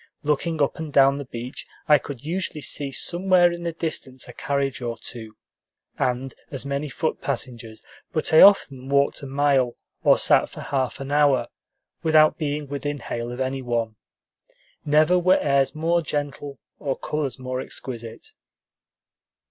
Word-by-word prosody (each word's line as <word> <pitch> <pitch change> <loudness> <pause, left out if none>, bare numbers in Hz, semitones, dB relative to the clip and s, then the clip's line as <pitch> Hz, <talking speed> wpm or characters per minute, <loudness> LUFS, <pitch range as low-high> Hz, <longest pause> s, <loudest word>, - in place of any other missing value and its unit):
Looking 150 +1 0
up 140 - -1
and 160 -2 -5
down 140 0 +5
the 140 - -6
beach, 120 +2 -7 0.2
I 150 -2 +6
could 140 -1 -9
usually 170 -1 -3
see 140 -1 -1
somewhere 175 +3 +3
in 170 0 -6
the 170 0 -2
distance 155 -6 -4
a 125 - -10
carriage 140 -1 -2
or 120 -1 -3
two, 110 -2 -8 0.6
and 130 0 -1 0.2
as 135 -1 -4
many 140 +1 -2
foot 155 +4 -2
passengers; 115 -3 -5 0.3
but 155 0 -1
I 160 - +8
often 135 -10 +5
walked 140 0 +2
a 140 - -7
mile, 135 -3 +2 0.3
or - - +5
sat - - +3
for - - -9
half 135 -1 -2
an 135 +1 -6
hour, 140 -5 +3 0.5
without 155 -1 +4
being 150 -1 -2
within 145 +1 -3
hail 120 -3 -5
of 125 - -7
any 130 +1 -2
one. 115 -3 -2 0.9
Never 155 +4 +4
were 185 +2 +4
airs 140 -1 +1
more 165 +2 +1
gentle 145 -2 -4 0.2
or 135 -2 -2
colors 150 -3 -3
more 130 0 -4
exquisite. 115 -4 -7
140 Hz, 155 wpm, -24 LUFS, 130-155 Hz, 0.9 s, I